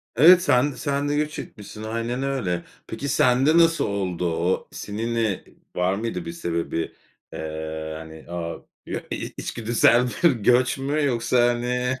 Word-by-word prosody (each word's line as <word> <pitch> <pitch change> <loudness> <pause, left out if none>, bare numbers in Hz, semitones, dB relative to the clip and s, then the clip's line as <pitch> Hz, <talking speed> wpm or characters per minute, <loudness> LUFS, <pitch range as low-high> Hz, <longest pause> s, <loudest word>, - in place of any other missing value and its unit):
Evet, 175 +6 +8
sen 135 -1 +3
d - - -11
sen 145 0 -1
de 145 - +1
göç 150 0 -1
etmişsin. 105 +1 -9
Aynen 115 +4 -2
öyle. 100 -11 -1 0.2
Peki 125 +6 -5
sende 135 +3 +4
nasıl 165 -1 +4
oldu 95 -3 -2
o? 90 +2 0
Senin, 115 +3 -4
eee, 110 -4 0 0.3
var 90 +1 +1
mıydı 115 - -3
bir 170 - -4
sebebi? 85 - -3 0.4
Eee, 80 0 -5
hani 80 0 -11
o 85 -1 -5 0.7
içgüdüsel 120 +1 +2 0.2
bir 170 - +7
göç 125 +3 +3
mü 145 +3 -1
yoksa 120 -1 +2
hani 125 +1 -1
120 Hz, 145 wpm, -24 LUFS, 95-135 Hz, 0.7 s, Evet